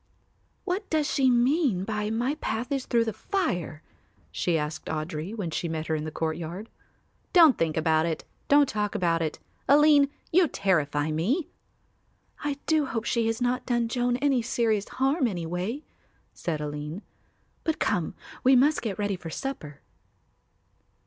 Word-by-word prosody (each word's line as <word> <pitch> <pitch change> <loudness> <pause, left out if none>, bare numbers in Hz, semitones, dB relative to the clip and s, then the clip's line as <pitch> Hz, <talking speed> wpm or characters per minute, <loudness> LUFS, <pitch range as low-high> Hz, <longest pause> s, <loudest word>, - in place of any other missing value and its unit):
"What 390 +2 -2
does 310 -2 +1
she 270 -3 +3
mean 245 - +2
by 210 0 -2
my 240 +5 0
path 245 -4 -3
is 275 -2 -1
through 235 -2 +2
the 220 - -2
fire?" 195 - -2 0.5
she 170 -2 0
asked 150 +1 -4
Audry, 155 +5 -4
when 190 -7 -3
she 170 - -2
met 160 -1 -3
her 160 - 0
in 155 0 -3
the 155 - -4
courtyard. 165 +6 -4 0.6
"Don't 330 -7 +8
think 160 -1 -1
about 160 0 +2
it, 160 - -3 0.2
don't 285 0 +5
talk 210 -2 -2
about 170 -4 +1
it. 155 -2 -2 0.3
Aline, 290 0 +6 0.2
you 350 0 +5
terrify 150 - 0
me." 250 - 0 0.9
"I 290 -2 -1
do 310 -3 +2
hope 230 -2 -3
she 230 -2 +1
has 225 0 -1
not 245 +1 -1
done 240 -2 +1
Joan 245 +1 0
any 270 -2 +2
serious 225 -3 0
harm 270 +1 +1
anyway," 180 - -3 0.5
said 155 -3 -3
Aline. 150 +5 -5 0.6
"But 320 -1 0
come, 180 -6 -1 0.3
we 260 +1 +6
must 285 +5 +4
get 215 -5 -3
ready 205 -1 -1
for 175 -2 -8
supper." 160 - -6
220 Hz, 155 wpm, -27 LUFS, 165-270 Hz, 0.9 s, Don't